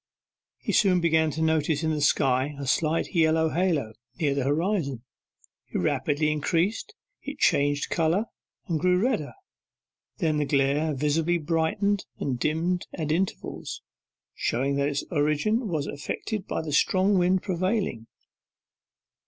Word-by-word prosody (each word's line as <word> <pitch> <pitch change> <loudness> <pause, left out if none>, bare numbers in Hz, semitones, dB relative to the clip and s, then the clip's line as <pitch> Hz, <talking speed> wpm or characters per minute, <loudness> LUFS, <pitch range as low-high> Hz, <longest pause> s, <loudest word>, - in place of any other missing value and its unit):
He - - -3
soon 185 -4 +4
began 160 -2 +2
to 160 +2 -2
notice 160 -1 +1
in 160 - +1
the 150 -1 -1
sky 135 -1 +2
a 140 - -5
slight 155 +4 0
yellow 160 -1 +3
halo, 160 -10 0 0.3
near 145 -4 +1
the 140 -2 -1
horizon. 145 - 0 0.6
It - - -4
rapidly 150 +1 +1
increased; 170 +7 -1 0.3
it - - -7
changed 145 0 +2
colour, 170 +6 +1 0.4
and 165 -5 -1
grew 180 +1 +3
redder; 215 - 0 0.8
then 160 -6 0
the 150 - +1
glare 140 +2 +1
visibly 155 +5 +1
brightened 170 +5 0
and 130 -3 -2
dimmed 165 +5 0
at 155 -2 -3
intervals, 180 +4 -3 0.5
showing 135 +4 -1
that 140 +1 +1
its 140 -1 -2
origin 160 - +1
was 155 -6 -1
affected 190 +8 -4
by - - -2
the 150 -2 -4
strong 190 +5 +3
wind 180 +1 +2
prevailing. 185 - -1
160 Hz, 135 wpm, -26 LUFS, 145-180 Hz, 0.8 s, soon